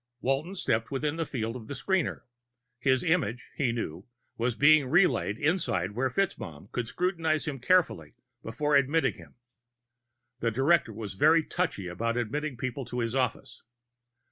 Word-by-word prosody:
Walton 140 +10 -1
stepped 110 - 0
within 145 +3 -2
the 165 -2 -2
field 115 -3 -3
of 115 -4 -8
the 140 - -5
screener. 185 +5 0 0.6
His 130 0 +2
image, 160 - 0
he 130 -4 +1
knew, 95 -6 -5 0.3
was 120 0 -1
being 145 0 +5
relayed 165 - +3
inside 130 - 0
where 130 +5 0
FitzMaugham 100 - -3
could 120 -2 -2
scrutinize 165 -1 0
him 140 -3 -4
carefully 180 -3 +1 0.3
before 145 +6 0
admitting 140 0 +3
him. - - -15 1.0
The 115 - +1
director 135 +3 +2
was 105 -2 -6
very 155 +10 +4
touchy 160 - -2
about 115 +7 -2
admitting 135 +4 -2
people 130 +3 -3
to 125 +1 -6
his 115 -1 -1
office. 130 -1 -2
130 Hz, 150 wpm, -28 LUFS, 115-155 Hz, 1.0 s, being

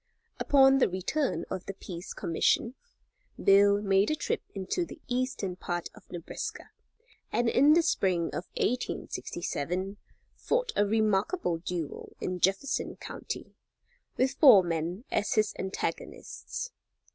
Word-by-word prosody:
Upon 270 -1 +5
the - - +4
return 190 +11 -1
of 185 - -4
the 195 - -5
Peace 180 -1 -8
Commission, 200 +7 +1 0.7
Bill 200 +1 +5
made 195 0 +3
a 310 - +1
trip - - -2
into 195 - -1
the 335 - -9
eastern 245 -7 -2
part 175 -1 -4
of 210 - -18
Nebraska, 175 -2 -6 0.6
and 240 - +1
in 280 +6 +5
the 335 +1 +4
spring 185 - +1
of 180 - -4
1867, 185 - -2 0.4
fought - - 0
a 205 - +3
remarkable 215 - +1
duel 170 -3 -5
in 180 0 -3
Jefferson 195 - 0
county, - - -7 0.6
with 260 +1 +2
four 220 - +9
men 170 +4 -2
as 205 - +1
his 215 -1 +2
antagonists. 340 - -4
200 Hz, 125 wpm, -29 LUFS, 180-255 Hz, 0.7 s, four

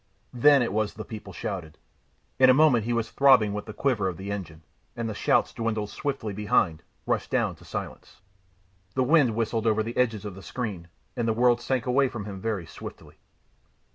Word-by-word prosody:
Then 140 +2 +5
it 115 - -2
was 110 -1 -1
the 110 - -7
people 110 -2 -8
shouted. 85 -7 -6 0.6
In 130 0 +7
a 130 - +7
moment 135 -7 +4
he 120 - -1
was 115 -1 -1
throbbing 130 -7 +5
with 105 +1 -5
the - - -5
quiver 120 -8 0
of 90 -3 -4
the 100 +1 -6
engine, 85 -6 -6 0.3
and 115 -1 -3
the 110 - -3
shouts - - +1
dwindled 110 -2 -2
swiftly 135 -7 -3
behind, 95 -5 +1 0.2
rushed - - -1
down - - +1
to - - -17
silence. - - -7 0.8
The 130 - +2
wind 135 -5 +4
whistled 115 0 -1
over 110 0 +2
the 115 +2 -6
edges 110 -5 +1
of 105 - -5
the 95 - -11
screen, 95 -3 -5 0.3
and 120 -2 -1
the 110 - +2
world 120 0 +4
sank 130 0 -1
away 135 +2 +3
from 110 -5 -6
him 100 -2 -7
very 105 -5 -2
swiftly. - - -11
110 Hz, 200 wpm, -26 LUFS, 100-125 Hz, 0.8 s, In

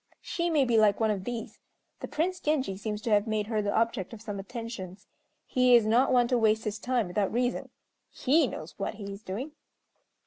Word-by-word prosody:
She 340 0 -1
may 300 -5 +3
be 235 -3 +3
like 210 -2 +4
one 220 -1 +2
of 195 -2 -3
these. 235 -2 -5 0.4
The - - -5
Prince 360 +4 -1
Genji 295 - 0
seems 210 +1 -4
to 230 - -1
have 205 +1 +3
made 215 -1 0
her 215 -1 -1
the 205 -1 -1
object 230 -3 0
of 220 - -9
some 205 -3 -5
attentions. 200 -3 -7 0.4
He 250 -1 +4
is 235 -3 +5
not 235 +5 +3
one 245 -1 +4
to 250 -2 +2
waste 220 -1 +3
his 210 0 -3
time 245 -1 0
without 195 +2 0
reason. 245 +2 -1 0.4
He 290 +2 +2
knows 155 -6 -7
what 200 - -3
he 200 -2 -7
is 195 - -10
doing." 220 +9 -5
225 Hz, 210 wpm, -28 LUFS, 205-250 Hz, 0.4 s, is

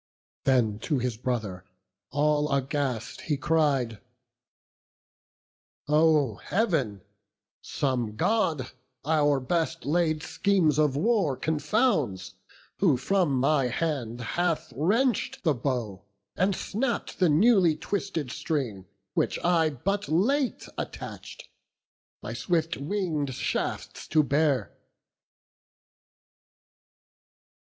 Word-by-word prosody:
Then 115 -6 +2
to 145 +5 -1
his 125 -2 -1
brother, 110 -6 -3 0.5
all 150 +2 +1
aghast, 135 -4 -2
he 150 -3 -1
cried: 140 -8 +1 1.9
"O 150 -6 +3
Heav'n, 155 - 0 0.6
some 125 -6 -2
God 155 - 0 0.3
our 145 -2 +3
best 165 +4 -1
laid 155 0 +1
schemes 175 -5 +2
of 150 -3 +3
war 180 - +1
Confounds, 155 - 0 0.5
who 165 -10 +4
from 170 +1 +1
my 135 +1 +2
hand 125 -4 -2
hath, 170 - -1
wrench'd 245 - +1
the 155 - +3
bow, 120 -7 -3 0.3
And 190 +2 +1
snapp'd 235 +7 -3
the 180 -3 +4
newly 180 0 +5
twisted 165 -6 -3
string, 125 - -3 0.3
which - - 0
I 170 -2 +3
But 195 +9 -2
late 240 - +1
attach'd, - - -7 0.8
my 105 +2 -5
swift 165 +7 0
wing'd 150 -4 -2
shafts - - -3
to 155 -1 +3
bear." 145 -1 +1
150 Hz, 95 wpm, -27 LUFS, 130-175 Hz, 1.9 s, newly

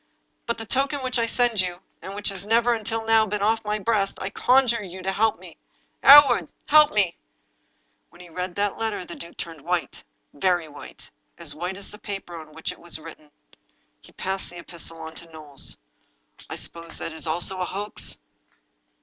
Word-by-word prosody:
" - - -47
By 235 - +1
the 225 - -7
token 270 +3 0
which 255 -1 +1
I 230 - +2
send 235 -3 +2
you, 180 -1 -3 0.2
and 195 +1 -7
which 205 0 +1
has 195 -1 -5
never, 230 +3 +3
until 225 0 -2
now, 225 -1 +5
been 205 0 -2
off 225 +2 +2
my 210 0 -1
breast, 210 -2 0
I 190 - -4
conjure 250 -1 +3
you 185 -1 -8
to 190 - 0
help 220 +3 +2
'me. - - -13 0.2
" - - -42
Hereward— 285 0 +9 0.2
A^/^ 300 0 +7
me!" 195 -5 +2 0.9
When 175 - -19
he 180 - -11
read 180 +1 -5
that 205 +1 -1
letter 220 -5 -2
the 175 - -8
duke 170 0 -10
turned 165 -3 -6
white 175 +2 -2 0.2
— - - -48
very 175 +1 +1
white, 145 -1 -12 0.3
as 165 -4 -5
white 180 +5 -4
as 200 - -5
the 210 - -11
paper 195 -4 -6
on 155 -2 -10
which 160 - -3
it - - -13
was 170 -1 -1
written. 155 -1 -12 0.7
He - - -18
passed 190 0 -2
the 175 - -10
epistle 170 -1 -6
on 160 0 -7
to 170 - -9
Knowles. 150 -3 -4 0.4
" - - -23
I - - -4
suppose 170 0 -2
that 165 - -4
also 170 +4 +1
is - - -3
a - - +1
hoax? 205 +3 -4
195 Hz, 205 wpm, -25 LUFS, 170-225 Hz, 0.9 s, Hereward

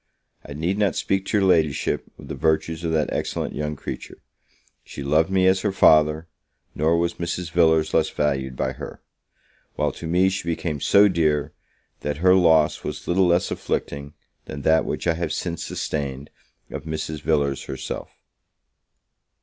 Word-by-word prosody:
I 75 - -9
need 85 +7 -2
not 100 -2 +2
speak 95 0 -1
to 105 - +1
your 100 - +3
Ladyship 80 -6 +1
of - - -12
the - - -5
virtues 80 +1 0
of 85 - -1
that 80 -2 0
excellent - - -3
young 75 0 -3
creature. - - -7 0.7
She 70 - -8
loved 75 +4 +2
me 95 -1 +2
as 95 0 +4
her 105 - 0
father; 80 -2 +4 0.5
nor 80 +3 +2
was 85 0 -1
Mrs. 85 0 -3
Villars 80 -2 +3
less - - +3
valued 65 -3 -1
by - - -1
her; - - -9 0.8
while - - 0
to 85 - -8
me 90 +3 +3
she 95 -2 -4
became 80 -3 -3
so 100 +1 +6
dear, 75 -6 0 0.5
that 75 -1 -3
her 90 +3 +5
loss 80 -4 +4
was 75 0 -6
little 90 +1 +3
less 85 +1 +2
afflicting 70 0 -4 0.3
than 70 - -7
that 80 0 +3
which - - -4
I 85 - +3
have 85 -1 -3
since 85 +1 -3
sustained 70 -2 -4 0.4
of 75 -1 -6
Mrs. 80 -1 -4
Villars 70 -4 0
herself. 65 0 -6
80 Hz, 165 wpm, -23 LUFS, 75-85 Hz, 0.8 s, so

